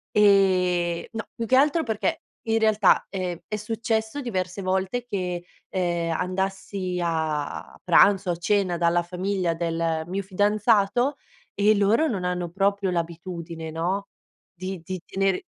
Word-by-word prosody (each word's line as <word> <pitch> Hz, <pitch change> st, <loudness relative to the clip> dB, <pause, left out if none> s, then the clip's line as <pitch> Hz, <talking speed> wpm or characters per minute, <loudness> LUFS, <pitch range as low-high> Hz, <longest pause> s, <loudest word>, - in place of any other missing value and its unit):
Ehm, 185 Hz, -4 st, +3 dB
no, 225 Hz, 0 st, -3 dB
più 230 Hz, -, -4 dB
che 255 Hz, -, +3 dB
altro 295 Hz, +5 st, +4 dB
perché 245 Hz, +8 st, -1 dB, 0.3 s
in 225 Hz, 0 st, +2 dB
realtà, 215 Hz, -3 st, +4 dB
ehm, 180 Hz, -3 st, -3 dB
è 215 Hz, -, -3 dB
successo 220 Hz, +3 st, -2 dB
diverse 190 Hz, -7 st, -3 dB
volte 190 Hz, +6 st, -1 dB
che, 180 Hz, -6 st, -3 dB, 0.2 s
ehm, 170 Hz, -3 st, -1 dB
andassi 185 Hz, +1 st, -2 dB
a 160 Hz, -3 st, -2 dB
pranzo 190 Hz, +1 st, +5 dB
o -, -, +1 dB
a -, -, -4 dB
cena 180 Hz, +1 st, +1 dB
dalla 170 Hz, 0 st, +2 dB
famiglia 180 Hz, 0 st, -1 dB
del 165 Hz, -1 st, -1 dB
mio 190 Hz, +3 st, -2 dB
fidanzato, 210 Hz, +6 st, +2 dB, 0.4 s
e 210 Hz, +2 st, +4 dB
loro 215 Hz, +10 st, +3 dB
non 195 Hz, -9 st, -2 dB
hanno 180 Hz, -1 st, -2 dB
proprio 195 Hz, +1 st, +1 dB
l'abitudine, 170 Hz, -1 st, -4 dB
no, 180 Hz, +5 st, -2 dB, 0.5 s
di 185 Hz, +1 st, -5 dB
di 185 Hz, +2 st, -5 dB
di -, -, -27 dB
tenere 195 Hz, -, 0 dB
190 Hz, 145 wpm, -25 LUFS, 175-210 Hz, 0.5 s, pranzo